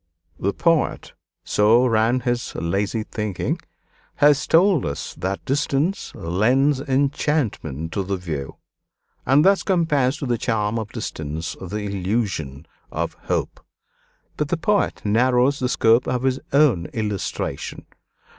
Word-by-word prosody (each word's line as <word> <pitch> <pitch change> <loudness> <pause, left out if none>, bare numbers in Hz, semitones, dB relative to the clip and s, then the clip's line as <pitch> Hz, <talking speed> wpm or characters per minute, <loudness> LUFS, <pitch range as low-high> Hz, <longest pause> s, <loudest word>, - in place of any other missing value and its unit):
"The 100 - 0
poet," 165 -3 +1 0.3
so 110 +4 +4
ran 115 +1 +2
his 120 -1 -2
lazy 100 +6 -1
thinking, 105 -4 -3 0.6
"has 145 0 +4
told 175 -3 +4
us 70 0 -4
that 95 +2 -4
'distance 145 +6 0
lends 125 - +2
enchantment 135 - -1
to 100 - -1
the 95 0 -2
view,' 80 -7 -5 0.7
and 140 +3 +5
thus 195 0 +5
compares 150 -8 +1
to 150 - -4
the 120 -3 0
charm 110 -1 0
of 110 -2 -6
distance 80 +2 -5
the 95 +3 -4
illusion 95 - -2 0.3
of - - -2
hope. - - -2 0.8
But 150 - 0
the 170 - -1
poet 205 +5 0
narrows 125 +5 +3
the 125 - 0
scope 115 0 +3
of 125 0 -1
his 130 0 +1
own 135 - +3
illustration. 105 -4 -4
120 Hz, 125 wpm, -22 LUFS, 100-140 Hz, 0.8 s, and